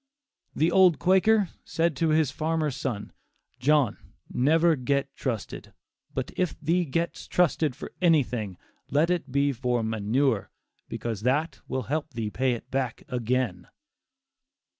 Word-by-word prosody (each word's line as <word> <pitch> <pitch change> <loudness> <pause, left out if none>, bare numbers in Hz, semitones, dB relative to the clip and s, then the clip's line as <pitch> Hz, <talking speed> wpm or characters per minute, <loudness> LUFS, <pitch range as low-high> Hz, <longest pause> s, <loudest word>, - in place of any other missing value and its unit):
The 160 +3 +2
old 185 -3 +6
Quaker 190 +2 +3
said 165 -1 0
to 165 +2 +2
his 155 -3 +3
farmer 155 0 -1
son, 120 -5 -4 0.5
"John, 140 -2 +3 0.4
never 160 +5 +4
get 140 +1 -1
trusted; 115 -8 -4 0.4
but - - -3
if 180 -4 -1
thee 170 +3 +1
gets 165 +4 -2
trusted 160 -5 +2
for - - -8
anything, 125 - +2 0.3
let 155 +5 +2
it 165 -7 -2
be 140 +1 +2
for 125 -2 -1
'manure,' 110 +2 0 0.4
because 115 -4 -4
that 140 +8 0
will 130 -1 -2
help 150 +7 -2
thee 110 -3 -3
pay 130 +1 +1
it 120 - -8
back 130 -3 -2
again." 120 -7 -1
140 Hz, 135 wpm, -27 LUFS, 125-165 Hz, 0.5 s, old